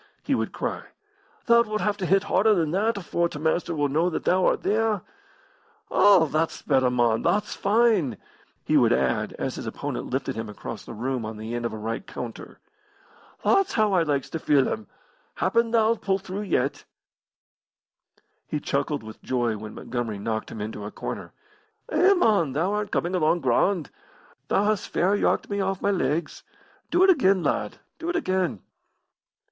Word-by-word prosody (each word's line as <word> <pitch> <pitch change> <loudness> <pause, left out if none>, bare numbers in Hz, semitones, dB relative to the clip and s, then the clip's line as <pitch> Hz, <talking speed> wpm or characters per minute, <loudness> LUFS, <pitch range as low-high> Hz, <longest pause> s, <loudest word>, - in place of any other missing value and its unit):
he - - 0
would - - -1
cry. - - -3 0.6
"Thou 235 -1 +6
wilt 215 -2 -2
have 210 -1 +1
to 185 -3 -3
hit 195 +2 +3
harder 210 +1 +3
than 160 -4 0
that 210 +5 +1
afore 170 -2 -1
t' - - -7
Master 160 +2 0
will 145 -1 +1
know 160 +6 +1
that 170 - -3
thou 185 0 +3
art - - +1
theer. 215 -1 +1 0.9
All, 195 -5 +6
thot's 155 +2 -1
better, 130 -3 +3
mon, 120 -2 +2
thot's 210 0 0
fine!" 205 - +2 0.5
he - - +3
would - - +4
add, 65 -1 0
as - - -3
his - - -6
opponent - - -4
lifted - - -2
him 110 -1 -5
across 105 +1 -7
the 115 - -9
room 125 +2 -2
on 110 0 -6
the 110 +2 -6
end 120 0 -1
of - - -8
a - - -5
right 115 - -4
counter. - - -8 0.9
"Thot's 390 -1 +3
how 215 -3 +2
I 180 - +4
likes 145 -4 0
to 165 - -3
feel 145 -3 +3
'em. 110 -2 -4 0.5
Happen 230 +5 +1
thou'lt 230 0 +2
pull 195 -1 +1
through 195 +1 -6
yet." 130 +3 0 1.6
He 150 - -2
chuckled 140 -1 -2
with 110 0 -11
joy 120 -3 0
when 105 0 -8
Montgomery 120 -4 -4
knocked 110 +2 -3
him 110 - -7
into 105 0 -5
a 105 - -5
corner. - - -6 0.6
"Eh, 390 +2 +5
mon, 200 - +2
thou 170 +8 0
art 210 -1 -2
coming 175 +2 -1
along 175 -1 +2
grand. 150 +6 +1 0.6
Thou 195 - +2
hast 210 -2 0
fair 190 +3 +2
yarked - - +1
me 200 0 0
off 190 -1 -1
my 200 - +1
legs. 155 -2 -1 0.5
Do 355 +2 +3
it 380 - +7
again, 195 - +3
lad, - - -1 0.2
do 335 +1 -4
it 350 - -1
again!" 185 - -1
170 Hz, 180 wpm, -25 LUFS, 125-205 Hz, 1.6 s, it